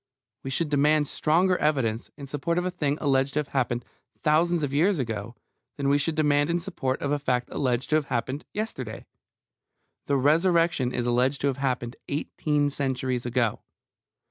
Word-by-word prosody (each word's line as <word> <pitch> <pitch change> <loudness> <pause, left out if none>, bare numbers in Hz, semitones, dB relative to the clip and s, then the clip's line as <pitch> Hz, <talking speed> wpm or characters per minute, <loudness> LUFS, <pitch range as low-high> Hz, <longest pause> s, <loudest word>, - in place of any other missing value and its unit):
We 135 - -5
should 150 +3 -1
demand 150 +1 +3
stronger 180 +7 +2
evidence 125 -7 0
in 140 - -7
support 145 +5 -2
of 180 - 0
a 185 - -1
thing 150 -5 -1
alleged 135 -1 +1
to 150 - +1
have 145 - -10
happened 120 -3 -1 0.3
a - - -38
thousand 170 +3 +3
years 175 +6 +3
ago 115 -3 -4 0.4
than 140 -1 0
we 145 +1 +4
should 155 +2 0
demand 145 -1 +2
in 170 +1 +1
support 135 -8 -2
of 140 - -1
a 145 - +1
fact 125 -3 -1
alleged 130 0 -1
to 155 - +5
have 155 - -1
happened 130 +4 -2
yesterday. 215 +2 -5 1.0
The 140 - +2
Resurrection 165 -1 +3
is 120 -1 -2
alleged 125 +3 +2
to 140 - +2
have 135 - -3
happened 125 -3 -2
eighteen 145 0 0
centuries 130 -3 -2
ago. 120 -3 0
140 Hz, 175 wpm, -26 LUFS, 130-155 Hz, 1.0 s, to